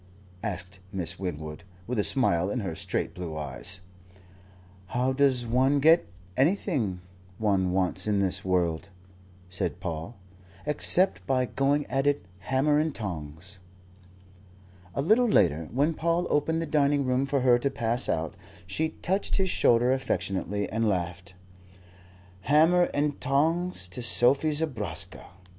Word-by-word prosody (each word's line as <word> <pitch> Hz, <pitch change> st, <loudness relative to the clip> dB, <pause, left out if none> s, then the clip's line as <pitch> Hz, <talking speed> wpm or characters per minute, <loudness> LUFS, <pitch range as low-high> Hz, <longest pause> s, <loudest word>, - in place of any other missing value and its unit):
asked 95 Hz, -2 st, -5 dB
Miss 90 Hz, -4 st, -1 dB
Winwood, 80 Hz, -4 st, -5 dB, 0.2 s
with 125 Hz, -2 st, -2 dB
a -, -, +3 dB
smile 95 Hz, -10 st, +3 dB
in 120 Hz, +3 st, -2 dB
her 95 Hz, -5 st, -3 dB
straight 80 Hz, -, -3 dB
blue 85 Hz, -4 st, -6 dB
eyes. 80 Hz, +6 st, -2 dB, 1.1 s
"How 125 Hz, +6 st, 0 dB
does 130 Hz, -3 st, +2 dB
one 130 Hz, +4 st, +2 dB
get 160 Hz, +4 st, +5 dB, 0.3 s
anything 135 Hz, -, 0 dB, 0.4 s
one 95 Hz, -4 st, +1 dB
wants 95 Hz, +1 st, +1 dB
in 105 Hz, -1 st, +2 dB
this 95 Hz, -1 st, +2 dB
world," 90 Hz, 0 st, 0 dB, 0.6 s
said 90 Hz, -1 st, -2 dB
Paul, 80 Hz, +7 st, -5 dB, 0.5 s
"except 165 Hz, +5 st, +2 dB
by 130 Hz, -1 st, +2 dB
going 140 Hz, +5 st, 0 dB
at 135 Hz, +2 st, -1 dB
it, 145 Hz, -10 st, +1 dB
hammer 135 Hz, +8 st, +1 dB
and 155 Hz, -1 st, -1 dB
tongs?" 90 Hz, -2 st, -6 dB, 1.4 s
A 140 Hz, -, 0 dB
little 225 Hz, +8 st, +4 dB
later, 80 Hz, -, +2 dB
when 145 Hz, +7 st, +1 dB
Paul 170 Hz, +2 st, 0 dB
opened 160 Hz, +3 st, +1 dB
the -, -, -3 dB
dining 145 Hz, -2 st, +2 dB
room 130 Hz, +2 st, +1 dB
for 140 Hz, -1 st, 0 dB
her 125 Hz, -1 st, +4 dB
to 140 Hz, -, 0 dB
pass 120 Hz, -2 st, -1 dB
out, 80 Hz, -1 st, -1 dB, 0.3 s
she 155 Hz, -, -1 dB
touched 190 Hz, +3 st, 0 dB
his 190 Hz, -2 st, +1 dB
shoulder 120 Hz, +2 st, +3 dB
affectionately 100 Hz, -5 st, -2 dB
and 110 Hz, 0 st, +1 dB
laughed. 90 Hz, 0 st, -3 dB, 1.0 s
"Hammer 160 Hz, -, +4 dB
and 145 Hz, 0 st, -1 dB
tongs 160 Hz, -, 0 dB
to 110 Hz, +7 st, -6 dB
Sophie 130 Hz, +6 st, +3 dB
Zobraska! 105 Hz, -, -3 dB
120 Hz, 135 wpm, -27 LUFS, 95-145 Hz, 1.4 s, get